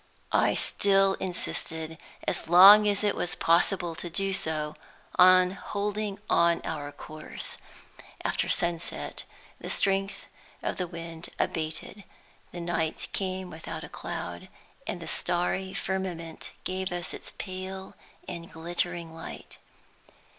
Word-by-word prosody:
I - - +4
still 195 -1 +3
insisted, 160 -3 -3 0.3
as - - 0
long 200 +4 +10
as 205 0 +2
it 205 - +3
was 175 - -1
possible 170 +1 +3
to 175 +1 -5
do 195 +3 0
so, 155 -4 -1 0.4
on 185 0 +8
holding 205 +1 -2
on 170 0 +4
our 145 -2 -3
course. 155 +1 -7 0.7
After - - 0
sunset, 170 -1 -1 0.3
the - - -6
strength 195 0 +1 0.4
of - - -1
the 180 - 0
wind 165 -1 -7
abated. 160 +5 -2 0.5
The 175 - -6
night 170 -2 -1
came 185 -1 -2
without 160 0 -6
a - - -8
cloud, 85 0 -5 0.4
and - - -2
the - - -7
starry 180 +2 0
firmament 180 -4 -3
gave 185 0 -2
us 175 0 -3
its - - -7
pale 190 0 -6 0.3
and 170 0 -6
glittering 170 0 -2
light. 165 - -9
175 Hz, 125 wpm, -29 LUFS, 165-190 Hz, 0.7 s, long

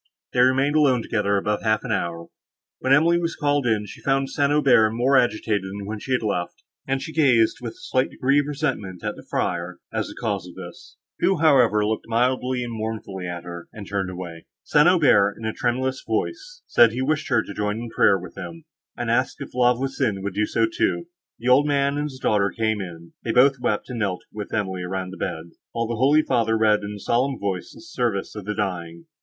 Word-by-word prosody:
They 125 - 0
remained 135 +4 +3
alone 135 -6 +3
together 100 -3 0
above 105 +1 -1
half 110 -1 +1
an 125 - -4
hour; 85 -5 -2 0.5
when 130 - -1
Emily 165 +5 +5
was 170 -1 -2
called 145 -3 +1
in, 110 -2 +1
she 100 - -11
found 135 0 0
St. 140 -1 +1
Aubert 130 -7 +4
more 125 +4 +2
agitated 110 -4 +2
than 100 +1 -6
when 105 +1 -5
she 130 - -3
had 125 - +1
left 90 -5 -3 0.2
him, - - -5
and 135 - -1
she 160 - -7
gazed, 125 -7 +3
with 115 -2 -5
a - - -22
slight 130 0 0
degree 140 +3 +2
of 145 - -1
resentment, 130 - -3
at - - -2
the - - -11
friar, 85 +1 -2 0.2
as - - -1
the - - -10
cause 100 -6 -2
of 90 - -12
this; - - -11 0.2
who, 190 - +2
however, 125 -9 +4
looked 110 +1 -2
mildly 125 +2 0
and 120 -1 -5
mournfully 110 -4 -5
at 85 -1 -5
her, 85 -1 -8
and 100 -3 -9
turned 95 -2 -2
away. 90 -2 -8 0.2
St. 150 +3 +4
Aubert, 105 - +4
in 115 - -7
a 110 - -1
tremulous 130 +2 -1
voice, - - -3
said, 115 -2 +5
he 130 +2 -2
wished 155 +2 -1
her 110 - +3
to - - -8
join 105 +1 -2
in 115 0 -6
prayer 100 - +4
with 90 -2 -10
him, 165 -1 -8 0.3
and 120 -1 -1
asked 130 +3 0
if - - -8
La 125 0 +4
Voisin 120 -6 -2
would 100 -1 -3
do 105 +2 0
so 115 - +2
too. 170 +9 -1 0.3
The 120 - -2
old 140 +4 +5
man 140 0 +1
and 145 - -1
his 130 - -10
daughter 105 -5 +2
came; 110 -1 -1 0.4
they 115 - -1
both 135 +3 +4
wept, 105 -4 -1
and 120 - -4
knelt 95 -4 -2
with 105 -2 -6
Emily 95 -4 -2
round 95 +1 -4
the - - -9
bed, 80 +1 -4 0.2
while 115 0 -1
the 115 - -3
holy 145 +5 +4
father 115 -5 +1
read 110 -1 +3
in 100 +1 -5
a 105 - -8
solemn 130 +6 0
voice 95 -3 -3
the - - -13
service 120 - -2
for 105 - -6
the 105 +2 -4
dying. 85 -5 -4
115 Hz, 225 wpm, -23 LUFS, 100-135 Hz, 0.5 s, Emily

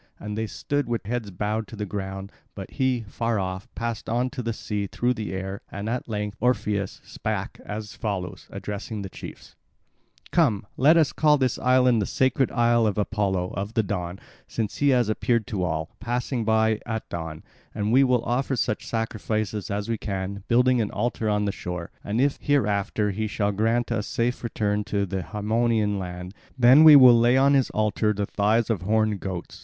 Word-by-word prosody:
And 105 0 -5
they 110 +1 -2
stood 145 +4 -2
with 115 -3 -2
heads 115 -1 -3
bowed 105 +4 -2
to - - -9
the 105 -1 -3
ground; 95 0 -5 0.2
but 95 -2 -8
he, 130 -3 0
far 115 +2 -1
off, 95 +3 -4
passed 115 -1 -4
on 120 +3 0
to 130 - -4
the 115 -1 -2
sea 105 -2 -3
through 120 +5 0
the 110 -3 -5
air; 95 +1 -4
and 100 +2 -5
at 120 +1 -3
length 105 0 -3
Orpheus 105 -5 0
spake - - -4
as 105 +1 -6
follows, 100 -5 -4
addressing 105 +1 -5
the 95 - -7
chiefs: - - -10 0.8
"Come, 105 -2 +2
let 150 +6 +5
us 155 -4 +3
call 150 -1 +4
this 130 -3 0
island 125 -2 +4
the 100 - -1
sacred 130 0 +1
isle 120 -2 +3
of 105 - -1
Apollo 100 -3 0
of 100 +3 -4
the 110 - +3
Dawn 90 -2 -4 0.3
since 110 -3 -3
he 145 - +3
has 125 -4 +3
appeared 115 +1 +1
to 100 -4 -3
all, 80 -2 -3
passing 120 +1 -2
by 110 0 +2
at 110 -1 -3
dawn; 80 -2 -6 0.3
and 105 +1 -1
we 130 +3 +6
will 125 -3 +2
offer 135 +2 0
such 110 -2 -2
sacrifices 110 -2 -2
as 100 0 -2
we 115 -2 -2
can, 100 -1 -4
building 125 +1 +4
an 105 - -1
altar 115 -2 -1
on 105 0 +1
the 100 - 0
shore; 90 -2 -6
and 105 +3 -2
if 140 +2 +2
hereafter 105 -6 +1
he 110 +3 -2
shall 105 -1 0
grant 115 +4 0
us 110 -2 -1
a - - -8
safe 120 +2 -1
return 105 -2 -1
to 100 -1 0
the 95 0 -3
Haemonian 105 0 0
land, 90 0 -6 0.2
then 130 +5 +7
will 155 -2 +11
we 130 -2 +9
lay 120 +2 +4
on 140 +1 +5
his 135 -3 +3
altar 105 0 +1
the 100 0 -2
thighs 110 +4 +1
of 100 -6 -1
horned 110 +1 +1
goats. 90 -2 -6
110 Hz, 195 wpm, -25 LUFS, 100-120 Hz, 0.8 s, will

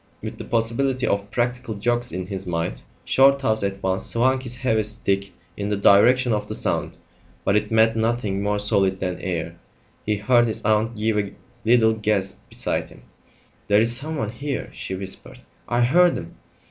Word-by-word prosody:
With - - -6
the - - -6
possibility 125 +3 0
of 100 -2 -1
practical 120 0 -2
jokes 120 +4 -1
in 90 0 -4
his 95 -1 -6
mind, 85 -8 -2 0.2
Shorthouse 135 -5 +3
at 100 -1 -3
once 95 0 0
swung 130 +3 +2
his 120 -2 -2
heavy 115 -4 +1
stick 100 -2 -2 0.2
in 100 0 -3
the 105 - 0
direction 120 +5 +5
of 105 - -2
the - - -4
sound; - - -2 0.5
but 100 - +2
it 105 - +1
met 110 0 +4
nothing 110 -3 -1
more 105 0 0
solid 100 -2 +1
than 90 -2 -3
air. 85 -2 -4 0.5
He 105 - 0
heard 120 +3 +3
his 110 - -3
aunt 110 +2 +2
give 105 0 +1
a 100 -1 -3 0.3
little 110 -1 +4
gasp 105 -3 -1
beside - - -2
him. - - -16 0.6
"There's 110 +3 +4
someone 140 -5 -1
here," 140 +4 -4
she 95 - -5
whispered; 95 0 -6 0.3
"I 120 0 +1
heard 170 +8 +4
him." 85 0 -9
110 Hz, 170 wpm, -23 LUFS, 100-120 Hz, 0.6 s, direction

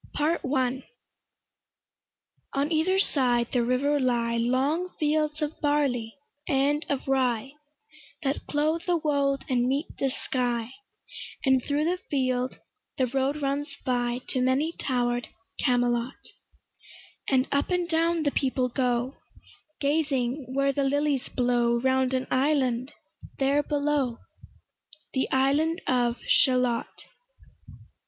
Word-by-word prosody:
PART 310 +3 +1
I 260 -1 0 1.7
On 280 +3 0
either 330 +4 +2
side 245 -10 +2
the 245 -2 +2
river 275 +4 +1
lie 240 -3 +1
Long 265 +9 +1
fields 305 0 +1
of 300 +1 -4
barley 275 -7 0 0.3
and 285 +2 +2
of 275 -2 -2
rye, 260 -2 +1 0.7
That 275 0 -2
clothe 310 +3 0
the 350 -1 +3
wold 280 -3 0
and 245 -1 +1
meet 280 +4 0
the 270 - +1
sky; 245 -2 -2 0.7
And 265 -2 +4
thro' 295 +1 0
the 355 +2 0
field 255 -2 0 0.4
the 260 - +3
road 275 +4 -1
runs 280 +2 -2
by 245 -1 0
To 255 - 0
many 265 +5 +2
tower'd 245 -5 -1 0.3
Camelot; 245 0 0 1.0
And 260 -1 +3
up 280 0 +1
and 360 -1 0
down 330 0 +1
the 285 - +1
people 260 -2 0
go, 250 +1 -1 0.6
Gazing 280 -3 0
where 275 0 +2
the 280 - 0
lilies 280 -1 0
blow 240 -1 +1
Round 260 +1 +2
an 260 0 -1
island 260 -2 +1 0.5
there 280 +2 +2
below, 285 -4 0 1.0
The 265 - 0
island 290 +6 +2
of 245 -2 +1
Shalott. 250 -3 +2
270 Hz, 120 wpm, -27 LUFS, 250-295 Hz, 1.7 s, And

